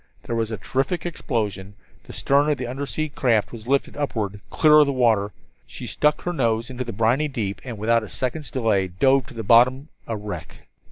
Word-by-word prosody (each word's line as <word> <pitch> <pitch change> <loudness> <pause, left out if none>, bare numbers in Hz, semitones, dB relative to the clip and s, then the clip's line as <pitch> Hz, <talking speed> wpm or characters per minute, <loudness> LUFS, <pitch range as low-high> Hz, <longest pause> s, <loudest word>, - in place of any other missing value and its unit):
There 120 - -3
was 115 -1 -1
a 110 - -4
terrific 135 - -2
explosion, 105 - -3 0.3
the - - -10
stern 140 +2 +2
of 150 - +1
the 125 - -4
undersea 135 +4 -3
craft 120 -7 +1
was 115 -1 -10
lifted 140 +1 0
upward, 110 -8 -3
clear 155 -1 +5
of 150 - +5
the - - +1
water, 115 -6 +2 0.4
she - - -8
stuck 150 0 +1
her 175 - -3
nose 115 -4 0
into 125 0 -4
the 120 - -6
briny 115 +8 +1
deep, 105 -8 -4
and 120 -4 -6
without 115 +3 +2
another 110 - -8
second's 145 +4 -3
delay, 110 -7 +1
dove 130 +8 +2
to 130 - -12
the 115 - -4
bottom, 130 +7 +4 0.2
a 115 - -3
wreck. 95 -5 -8
120 Hz, 205 wpm, -23 LUFS, 110-140 Hz, 0.4 s, clear